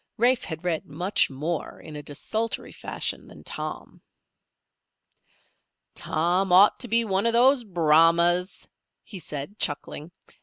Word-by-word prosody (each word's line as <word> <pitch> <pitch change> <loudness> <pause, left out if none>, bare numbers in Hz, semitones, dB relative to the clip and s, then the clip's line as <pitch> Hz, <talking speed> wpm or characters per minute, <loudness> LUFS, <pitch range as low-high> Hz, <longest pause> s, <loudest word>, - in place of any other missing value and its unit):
Rafe 245 +2 +3
had 160 -1 -7
read 170 -3 -2
much 175 +7 +1
more 150 +4 -4
in 155 - -11
a 150 - -6
desultory 220 +11 -4
fashion - - -5
than - - -14
Tom. - - -7 1.9
"Tom 180 +4 0
ought 190 +3 +6
to 250 - -1
be 230 0 +2
one 195 +1 +1
of 230 - +1
those 250 +2 +5
Brahmas," 170 0 +3 0.4
he 195 - -9
said, 150 +5 -7
chuckling. 150 +2 -2
180 Hz, 125 wpm, -25 LUFS, 155-215 Hz, 1.9 s, ought